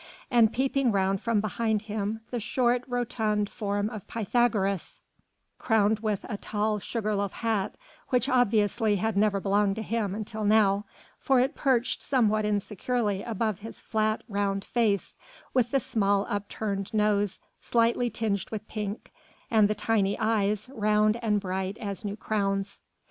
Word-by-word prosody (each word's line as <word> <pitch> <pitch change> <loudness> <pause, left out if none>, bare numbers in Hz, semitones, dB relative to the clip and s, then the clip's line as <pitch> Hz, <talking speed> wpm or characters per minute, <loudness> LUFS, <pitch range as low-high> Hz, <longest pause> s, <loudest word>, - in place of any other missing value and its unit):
And 230 -3 +5
peeping 265 0 +1
round 195 -1 +1
from 230 -3 +1
behind 215 +1 -1
him 215 0 -3
the 245 - -1
short, 240 +2 +1
rotund 220 -4 -1
form 205 0 -1
of 215 -5 -8
Pythagoras, 215 -4 0 0.6
crowned 220 -2 +2
with 215 -3 -2
a 210 - -4
tall 210 +1 -1
sugar 215 +1 -2
loaf 200 -1 -1
hat 220 -4 -1 0.3
which 250 0 +2
obviously 220 -4 +2
had 220 +2 -1
never 200 0 +2
belonged 200 0 +2
to 220 - -4
him 210 -3 -1
until 215 0 -4
now, 205 -1 +3 0.3
for 265 -2 +3
it 265 +4 +2
perched 255 -3 +1
somewhat 215 -5 +2
insecurely 210 0 -1
above 215 -3 -2
his 225 +2 -9
flat, 215 -1 0
round 200 -1 -1
face, 215 -5 0 0.4
with 245 -2 +2
the 275 - +2
small, 200 -4 +1
upturned 200 -1 -3
nose 205 -2 +1 0.2
slightly 235 +1 +2
tinged 205 -5 -2
with 215 -1 -6
pink 210 -1 -5 0.4
and 215 -2 +5
the 215 - -1
tiny 205 -2 +1
eyes, 215 -1 +1
round 215 0 +2
and 210 -3 +2
bright 190 +1 -3
as 200 -5 -5
new 205 -1 -3
crowns. 200 -2 -2
215 Hz, 150 wpm, -27 LUFS, 200-230 Hz, 0.6 s, And